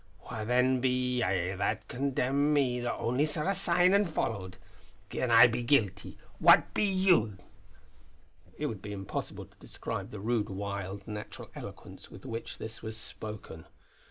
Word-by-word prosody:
Wha 110 -3 -5
then 125 +2 +2
be 125 -1 +1
ye 90 0 0
that 105 +2 -2
condemn 140 +2 +1
me 130 -4 +2
that 120 0 -1
only 125 +5 0
saw 150 +2 -1
a 195 - +3
sign 180 -1 +3
an' 200 +1 +4
followed? 100 - -3 0.5
Gin 125 - -1
I 115 +1 +9
be 120 0 +1
guilty, 105 -6 +1 0.2
what - - +6
be 210 - +2
you?" 185 - +3 1.2
It - - -2
would 105 -4 -4
be 105 +1 -6
impossible 95 -1 -5
to - - -26
describe - - -5
the 105 - -8
rude, 110 0 0
wild, 100 0 -5
natural 105 -1 -7
eloquence - - -10
with - - -13
which 115 0 -5
this 110 0 -7
was 110 -1 -6
spoken. 105 -7 -8
115 Hz, 155 wpm, -30 LUFS, 105-135 Hz, 1.2 s, I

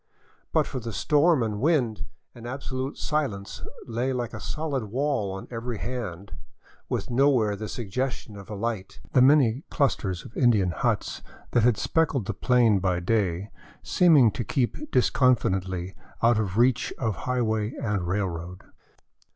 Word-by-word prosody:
But - - +3
for 130 - -5
the 115 -2 -6
storm 150 - +3
and 105 -2 -3
wind, 130 - +1 0.3
an 120 0 -10
absolute 130 +1 -4
silence 135 -11 -2 0.2
lay 120 +3 -1
like 120 -2 -3
a - - -6
solid 145 -6 -3
wall 125 -2 -1
on 95 0 -7
every 115 0 -4
hand, 100 -6 -5 0.6
with - - -3
nowhere 120 -5 +3
the 110 +1 -6
suggestion 120 0 -4
of 100 -1 -11
a 105 - -5
light, 105 -2 -4
the 130 - +5
many 135 -1 +5
clusters 95 - 0
of 115 - -12
Indian 110 -8 +3
huts - - -1 0.3
that 120 - +3
had 115 -1 +3
speckled 150 -8 +1
the - - -2
plain 120 -5 +3
by 90 -2 0
day 95 -1 0 0.3
seeming 150 -10 +5
to 120 - -3
keep 130 - -2
disconfidently 95 -8 +1 0.3
out 115 -1 +5
of 100 -2 -2
reach 120 +1 +3
of 110 -6 -1
highway 110 -3 0
and 100 -5 -1
railroad. 90 -1 -3
115 Hz, 150 wpm, -26 LUFS, 100-130 Hz, 0.6 s, the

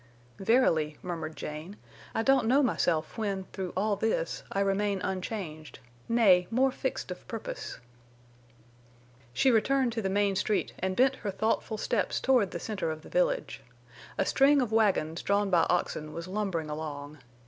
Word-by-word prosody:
"Verily," 165 - +2
murmured 160 -3 -4
Jane, 155 +7 -7 0.4
"I 225 - +1
don't 265 -2 +3
know 275 +4 +4
myself 175 -6 0
when, 200 -3 -1
through 185 -3 -4
all 205 +2 +1
this, 200 -5 -1
I 195 - -1
remain 200 0 +1
unchanged—nay, 180 - 0
more 260 +3 +3
fixed - - -3
of - - -8
purpose." - - -6 1.5
She 260 - +3
returned 245 +2 +2
to 225 - -2
the 190 - -1
main 200 0 +1
street 205 +2 0
and 190 0 -1
bent 265 +3 +3
her 210 - -4
thoughtful 220 +2 -1
steps 215 0 0
toward 250 -7 +3
the 170 - -5
center 205 -3 -3
of 155 0 -5
the - - -12
village. - - 0 0.6
A - - +2
string 280 +2 +4
of 245 -4 0
wagons 190 -7 +2
drawn 200 0 +1
by 170 -2 +4
oxen 155 -3 -1
was 170 +1 -6
lumbering 185 -6 -2
along. 150 -1 -6
200 Hz, 155 wpm, -29 LUFS, 165-225 Hz, 1.5 s, know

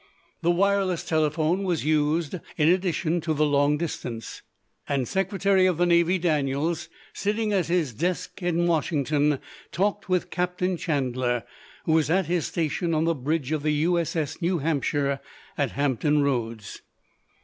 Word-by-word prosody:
The 170 - +1
wireless 190 0 +2
telephone 155 +3 +1
was 175 -6 -1
used 155 +2 +1 0.2
in 150 0 +4
addition 175 -2 +1
to 155 -1 -1
the 155 +1 +3
long 145 0 +3
distance, 125 -8 -5 0.5
and 135 -4 0
Secretary 195 -1 +2
of 180 -4 +1
the 175 - +3
Navy 170 +1 +3
Daniels, 155 -1 0 0.2
sitting 210 +1 -1
at 190 -4 +1
his 170 -7 0
desk 180 - -3
at 175 -2 0
Washington, 150 -3 +1 0.3
talked 200 +2 -1
with 180 -1 0
Captain 180 +1 -1
Chandler, 130 - -1 0.4
who - - +1
was 160 -2 +3
at 185 +2 +2
his 170 0 0
station 165 +1 -1
on 155 - +2
the 165 0 +2
bridge 150 0 -2
of 155 -2 0
the 150 0 +1
U.S.S. 160 0 0
New 175 +1 +1
Hampshire 140 -2 0 0.4
at - - -1
Hampton 145 +1 +1
Roads. 115 -6 -2
160 Hz, 150 wpm, -25 LUFS, 145-180 Hz, 0.5 s, in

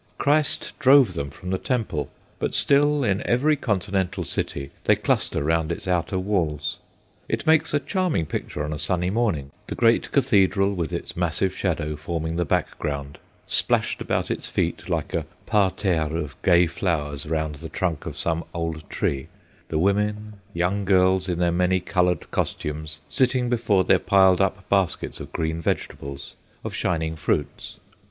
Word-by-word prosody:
Christ 150 +1 +1
drove 135 -7 +6
them 70 -4 -3
from 90 +6 -7
the 95 - 0
Temple, 110 - -2 0.3
but - - -2
still, 145 +1 +3
in 100 -3 +1
every 145 +6 +2
continental 95 -6 -1
city, 70 -3 -3
they - - +5
cluster - - 0
round 80 +1 +1
its 85 - -5
outer 90 +1 0
walls. 85 -6 -1 0.5
It - - -2
makes 160 0 +4
a 145 - +2
charming 180 - 0
picture 75 0 -4
on 75 - -3
a 75 - -4
sunny 90 +3 0
morning, 95 - 0 0.2
the - - -4
great 115 -1 +3
cathedral 100 -6 +3
with 85 -4 -3
its - - -5
massive 90 +2 0
shadow 80 -5 -1
forming 80 +1 -3
the 85 0 0
background; 70 -1 -2 0.3
splashed - - +1
about - - -1
its - - -3
feet, - - -2
like - - -2
a - - -1 0.2
parterre 95 -6 +1
of 75 -5 -4
gay 85 0 +5
flowers 80 -4 -2
around 80 -2 -2
the 80 +2 -8
trunk 85 -1 -2
of - - -6
some 85 0 0
old 80 -2 -4
tree, 70 -1 -1 0.4
the 80 - -2
women, 105 +3 0
young 95 +3 0
girls 95 -1 +3
in 90 - -1
their 85 0 +2
many 90 +2 +2
coloured 90 -2 0
costumes, 75 +1 -3
sitting 130 -2 +1
before 110 -5 +2
their - - +4
piled 95 -1 +4
up 95 0 -1
baskets 95 -3 0
of - - -8
green 80 0 -2
vegetables, 70 -3 -4 0.3
of - - -5
shining 80 -2 -1
fruits. 75 -2 -2
90 Hz, 160 wpm, -24 LUFS, 80-100 Hz, 0.5 s, drove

